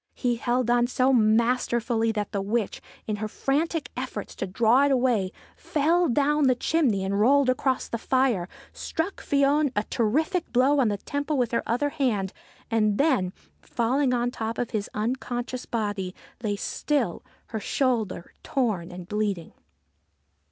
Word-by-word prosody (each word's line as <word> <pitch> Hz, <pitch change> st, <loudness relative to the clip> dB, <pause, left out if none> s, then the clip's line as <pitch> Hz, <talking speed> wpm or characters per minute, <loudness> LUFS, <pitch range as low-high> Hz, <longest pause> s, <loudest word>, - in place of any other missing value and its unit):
He 245 Hz, -2 st, 0 dB
held 240 Hz, 0 st, 0 dB
on 240 Hz, 0 st, +3 dB
so 255 Hz, +1 st, +2 dB
masterfully 230 Hz, 0 st, +2 dB
that 210 Hz, -2 st, -3 dB
the 200 Hz, -, -1 dB
witch, 210 Hz, +1 st, -2 dB, 0.2 s
in 215 Hz, -1 st, -2 dB
her 215 Hz, +1 st, -3 dB
frantic 300 Hz, +7 st, -1 dB
efforts 250 Hz, -5 st, -5 dB
to 195 Hz, -, -3 dB
draw 230 Hz, +8 st, +4 dB
it 285 Hz, -, +2 dB
away, 245 Hz, -8 st, +2 dB, 0.2 s
fell 330 Hz, +3 st, +1 dB
down 290 Hz, +4 st, +2 dB
the 255 Hz, -, +4 dB
chimney, 240 Hz, -9 st, +1 dB
rolled 255 Hz, +7 st, +4 dB
across 260 Hz, 0 st, 0 dB
the 230 Hz, -, -4 dB
fire, 245 Hz, -9 st, +1 dB, 0.2 s
struck 335 Hz, +5 st, -3 dB
Fion 285 Hz, 0 st, +2 dB
a 205 Hz, -, +1 dB
terrific 315 Hz, -, 0 dB
blow 265 Hz, +4 st, +3 dB
on 255 Hz, -, +4 dB
the 205 Hz, -1 st, 0 dB
temple 285 Hz, +7 st, -2 dB
with 245 Hz, -3 st, +1 dB
her 235 Hz, -, +1 dB
other 250 Hz, +5 st, +1 dB
hand, 215 Hz, -10 st, -1 dB, 0.4 s
and 215 Hz, -2 st, +2 dB
then, 260 Hz, -, +2 dB, 0.3 s
falling 255 Hz, +3 st, 0 dB
on 245 Hz, 0 st, 0 dB
top 225 Hz, -1 st, -4 dB
of 245 Hz, -, -2 dB
his 210 Hz, -3 st, -2 dB
unconscious 245 Hz, +2 st, -3 dB
body, 205 Hz, -5 st, -2 dB, 0.3 s
lay 210 Hz, -3 st, -1 dB
still, 250 Hz, -, -1 dB, 0.3 s
her 220 Hz, -, -3 dB
shoulder 225 Hz, -8 st, -1 dB
torn 215 Hz, -10 st, -1 dB
and 175 Hz, 0 st, -9 dB
bleeding. 205 Hz, -4 st, -2 dB
240 Hz, 150 wpm, -26 LUFS, 215-270 Hz, 0.4 s, draw